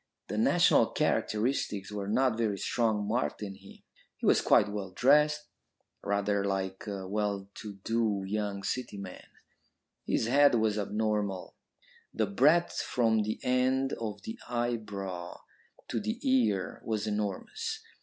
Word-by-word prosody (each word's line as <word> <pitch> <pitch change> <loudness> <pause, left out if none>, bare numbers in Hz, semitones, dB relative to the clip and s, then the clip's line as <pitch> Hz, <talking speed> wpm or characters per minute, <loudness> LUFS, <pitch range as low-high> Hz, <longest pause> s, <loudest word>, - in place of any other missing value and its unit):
The - - -3
national - - +5
characteristics 105 -3 0
were 100 -1 -4
not 125 +3 +2
very 110 -3 0
strongly 110 +1 0
marked 115 0 -1
in 100 -1 -5
him. 95 0 -15 0.3
He - - -5
was - - +5
quite 105 - +5
well 100 -2 -4
dressed, 150 +9 +4 0.6
rather 100 0 0
like 95 0 -2
a 100 -2 -4
well 100 -1 -2
to 105 -2 -7
do 110 -4 0
young 100 0 -2
City 120 0 -3
man. 95 -2 -9 0.8
His - - +1
head 140 +2 +5
was 110 -2 +1
abnormal. 105 -2 -1 0.6
The - - +2
breadth 170 -3 +3
from 115 -3 +2
the 110 +1 -2
end 130 +1 +2
of 110 -3 -5
the 225 +2 -6
eyebrow 105 -7 -3 0.5
to - - -1
the 220 +3 -3
ear 245 - +1
was 110 -2 -2
enormous. 420 - -3
105 Hz, 135 wpm, -30 LUFS, 100-125 Hz, 0.8 s, national